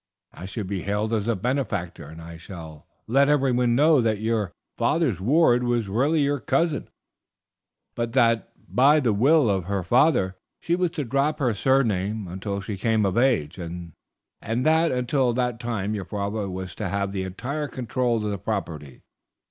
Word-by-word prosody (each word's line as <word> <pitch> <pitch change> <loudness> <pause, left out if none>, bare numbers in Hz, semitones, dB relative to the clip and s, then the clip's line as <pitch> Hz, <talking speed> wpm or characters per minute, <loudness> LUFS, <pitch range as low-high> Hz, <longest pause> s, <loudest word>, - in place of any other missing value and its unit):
I 90 - -9
shall 105 +3 -5
be 95 -1 -4
hailed 105 +4 -1
as 110 -1 0
a 115 - +1
benefactor, 100 - -3
and 80 +2 -11
I 85 0 -9
shall 80 -3 -11 0.2
let 140 +4 +3
everyone 125 -4 +2
know 150 +1 +5
that 110 -2 +1
your 110 -4 -1 0.2
father's 140 - +1
ward 125 - +4
was 120 -3 0
really 140 +10 +2
your 145 0 +1
cousin, 165 +2 0 1.0
but 115 -1 -3
that 115 -2 +2 0.2
by 145 +5 +4
the 120 -7 +1
will 135 +6 +4
of 95 -4 0
her 100 -1 -2
father 120 - +2 0.2
she 170 - 0
was 180 -1 +1
to 150 - 0
drop 140 +5 0
her 125 -5 +1
surname 110 -4 +1
until 100 +3 -4
she 100 +1 -5
came 110 0 +1
of 95 -1 0
age; 115 - +1
and 85 -1 -7 0.5
that 155 +9 +2
until 125 0 +1
that 125 -1 -1
time 110 -4 -2
your 100 -3 -4
father 100 0 -3
was 95 0 -6
to 105 -4 -4
have 100 0 -1
the 95 -1 -3
entire 130 +11 -4
control 120 -3 -1
of 105 - -1
the 100 - -4
property. 80 - -5
115 Hz, 170 wpm, -24 LUFS, 95-130 Hz, 1.0 s, know